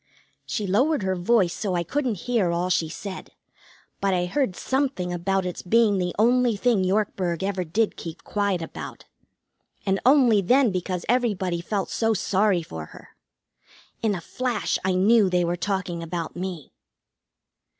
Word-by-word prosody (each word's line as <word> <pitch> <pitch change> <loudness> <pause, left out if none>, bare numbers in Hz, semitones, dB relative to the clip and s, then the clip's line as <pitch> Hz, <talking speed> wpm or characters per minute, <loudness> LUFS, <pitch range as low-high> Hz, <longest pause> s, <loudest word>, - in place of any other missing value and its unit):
She 210 - -2
lowered 250 +7 +2
her 190 0 0
voice 180 0 +2
so 195 -4 -2
I 175 - 0
couldn't 240 - -2
hear 235 -8 +1
all 175 +2 0
she 170 -3 +1
said, 190 +4 -8 0.7
but 195 -1 +1
I 180 0 +1
heard 205 0 -1
something 260 -10 -1
about 190 +2 0
its 180 - -4
being 210 0 +3
the 180 -1 -2
only 240 +1 +3
thing 215 -2 +2
Yorkburg 185 -3 0
ever 195 -2 -1
did 205 +7 0
keep 165 0 -8
quiet 200 -4 -1
about. - - -8 0.8
And 195 -1 +1
only 250 -6 +5
then 250 +4 +4
because 180 -1 -3
everybody 200 -8 0
felt 195 +2 -3
so 225 -1 +1
sorry 195 -2 +1
for 80 - -8
her. - - -14 0.9
In 215 -3 +1
a 175 - -5
flash 245 +4 -2
I 185 0 +1
knew 205 +2 +4
they 180 -1 +2
were 170 +1 0
talking 180 -1 -2
about 165 0 -4
me. 175 -5 -6
190 Hz, 160 wpm, -24 LUFS, 180-225 Hz, 0.9 s, only